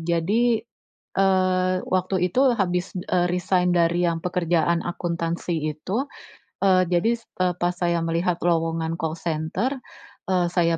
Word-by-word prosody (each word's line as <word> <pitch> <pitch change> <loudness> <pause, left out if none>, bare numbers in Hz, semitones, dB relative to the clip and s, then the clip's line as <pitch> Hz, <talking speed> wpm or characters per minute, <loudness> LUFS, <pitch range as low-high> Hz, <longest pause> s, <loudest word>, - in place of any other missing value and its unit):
jadi, 210 +8 +1 0.5
eee, 185 -1 +2
waktu 185 +1 0 0.2
itu 255 - +2 0.2
habis, 180 -2 -1
eee, 180 0 0
resign 180 0 +1
dari 170 +1 +2
yang 165 0 -3
pekerjaan 170 -1 +1
akuntansi 170 0 -3 0.2
itu, 220 - -3 0.6
eee, 185 -2 +4
jadi 180 +6 +2
s 230 - -26 0.2
eee, 180 - +2
pas 175 0 0
saya 170 -1 0
melihat 170 +2 0
lowongan 165 -1 0
call 165 -1 -3
center, 165 - -2 0.5
eee, 180 -2 +2
saya 170 -2 +2
175 Hz, 135 wpm, -24 LUFS, 170-185 Hz, 0.6 s, eee